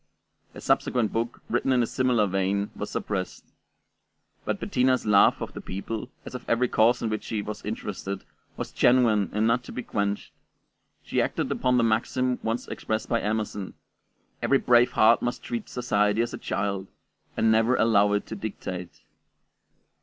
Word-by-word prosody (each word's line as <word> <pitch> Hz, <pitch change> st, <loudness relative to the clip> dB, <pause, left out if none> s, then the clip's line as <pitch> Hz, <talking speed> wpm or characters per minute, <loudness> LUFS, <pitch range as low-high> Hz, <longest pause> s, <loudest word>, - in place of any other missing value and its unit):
A -, -, -9 dB
subsequent 120 Hz, -4 st, +1 dB
book, 115 Hz, +1 st, -3 dB
written 135 Hz, -, 0 dB
in 125 Hz, -2 st, +4 dB
a -, -, +2 dB
similar 125 Hz, -3 st, +2 dB
vein, 95 Hz, +1 st, 0 dB
was -, -, -5 dB
suppressed. -, -, -4 dB, 1.0 s
But -, -, -1 dB
Bettina's 130 Hz, 0 st, +1 dB
love 105 Hz, -2 st, +5 dB
of -, -, -7 dB
the -, -, -7 dB
people, 105 Hz, +5 st, -5 dB, 0.2 s
as -, -, -8 dB
of 125 Hz, -, -6 dB
every 120 Hz, +2 st, +3 dB
cause 115 Hz, +1 st, +3 dB
in 115 Hz, -, 0 dB
which 110 Hz, -, -2 dB
she 105 Hz, -2 st, -3 dB
was 105 Hz, +1 st, -6 dB
interested, 100 Hz, -2 st, -5 dB, 0.3 s
was -, -, -5 dB
genuine 115 Hz, -5 st, +3 dB
and 105 Hz, +2 st, +1 dB
not 115 Hz, +2 st, +2 dB
to -, -, -9 dB
be 125 Hz, -, -5 dB
quenched; 100 Hz, -2 st, -2 dB, 0.7 s
she -, -, 0 dB
acted -, -, -1 dB
upon 125 Hz, 0 st, +2 dB
the 120 Hz, -, +3 dB
maxim 125 Hz, +3 st, +1 dB
once 115 Hz, +2 st, -2 dB
expressed 110 Hz, 0 st, -3 dB
by 115 Hz, -, +1 dB
Emerson, 105 Hz, -2 st, -3 dB, 0.7 s
"Every 140 Hz, -, +3 dB
brave 120 Hz, -1 st, +4 dB
heart 115 Hz, +2 st, +5 dB
must 120 Hz, -, -3 dB
treat 120 Hz, -2 st, -4 dB
society 105 Hz, -3 st, +1 dB
as 120 Hz, -, -5 dB
a -, -, -5 dB
child, 100 Hz, -1 st, -2 dB, 0.5 s
and 110 Hz, -, +3 dB
never 115 Hz, +3 st, +3 dB
allow 105 Hz, -3 st, +4 dB
it 105 Hz, -, 0 dB
to 110 Hz, -, -6 dB
dictate." 95 Hz, -4 st, -6 dB
110 Hz, 170 wpm, -26 LUFS, 105-120 Hz, 1.0 s, love